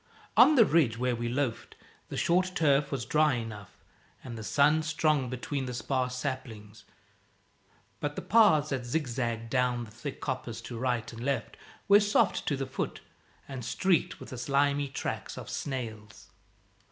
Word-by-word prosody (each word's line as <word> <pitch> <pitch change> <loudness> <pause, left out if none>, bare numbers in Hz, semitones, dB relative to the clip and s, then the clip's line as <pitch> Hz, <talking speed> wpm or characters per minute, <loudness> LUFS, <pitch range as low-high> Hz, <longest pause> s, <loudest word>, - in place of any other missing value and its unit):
On 310 - +7
the 235 -5 +7
ridge 145 - +3
where 125 0 0
we 120 0 -3
loafed, 125 -2 -2 0.3
the - - -5
short 180 +2 +2
turf 140 -5 +3
was 135 - -2
dry 155 -2 +3
enough, 110 -4 -7 0.5
and 120 -2 -7
the 110 - -7
sun 145 +7 +3
strong 150 -3 +1
between 130 +2 -3
the 125 - -4
sparse 125 +1 -1
saplings; 115 -6 -6 1.1
but 145 0 -3
the - - -5
paths 160 -10 +5
that 135 -3 -2
zigzagged 120 -4 -2
down 125 -2 +1
the 110 - -11
thick 130 +5 -7
coppice 130 -4 -4
to 120 -2 -7
right 120 -2 -1
and 115 +1 -7
left 140 +1 -2 0.3
were 205 0 +8
soft 210 0 +2
to 140 - +1
the 135 - -2
foot, - - -4 0.5
and 135 -3 -6
streaked 180 +6 +1
with - - -10
the 130 - -7
slimy 140 +2 +1
tracks 135 - -5
of - - -7
snails. 110 -6 -6
130 Hz, 165 wpm, -29 LUFS, 120-150 Hz, 1.1 s, were